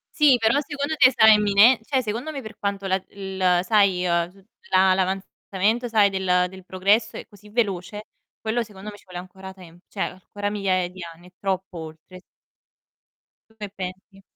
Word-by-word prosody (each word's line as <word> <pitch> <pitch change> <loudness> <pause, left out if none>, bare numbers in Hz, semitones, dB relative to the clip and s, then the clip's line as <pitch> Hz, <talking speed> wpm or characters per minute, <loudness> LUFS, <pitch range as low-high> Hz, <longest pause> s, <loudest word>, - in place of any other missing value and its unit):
Sì, 290 -5 +5
però 225 +5 +2
secondo 290 +1 -3
te 255 -2 +6
sarà 220 -2 +7
imminе 210 +3 +5
cioè, 265 0 0
secondo 235 +8 -4
me, 275 -3 -6
per 220 -1 -10
quanto 200 -1 -3
la 190 0 0
il, 190 -2 0
sai, 195 -3 +2
uhm, 170 0 0
tu 195 0 -22 0.2
la 185 0 +4
l' - - -3
avanzamento, 195 +4 -1
sai, 210 -3 +4
del 180 -2 +1
del 190 0 -13
progresso 205 +5 +1
è - - -8
così 210 -1 -18
veloce, 210 -2 -2 0.4
quello 225 +2 -1
secondo 210 0 -10
me 205 - -12
ci - - -21
vuole 180 -1 -9
ancora 190 +1 -10
tem 175 -3 -15
cioè, 200 - -9
ancora 205 +2 -4
migliaia 185 -3 0
di 185 +1 -13
anni, 170 +1 -13
è - - -23
troppo 190 -2 -3
oltre. 160 +3 -11 1.3
Tu 220 - -27
che 205 -2 -7
pensi? 190 +1 -8
195 Hz, 185 wpm, -23 LUFS, 185-215 Hz, 1.3 s, sarà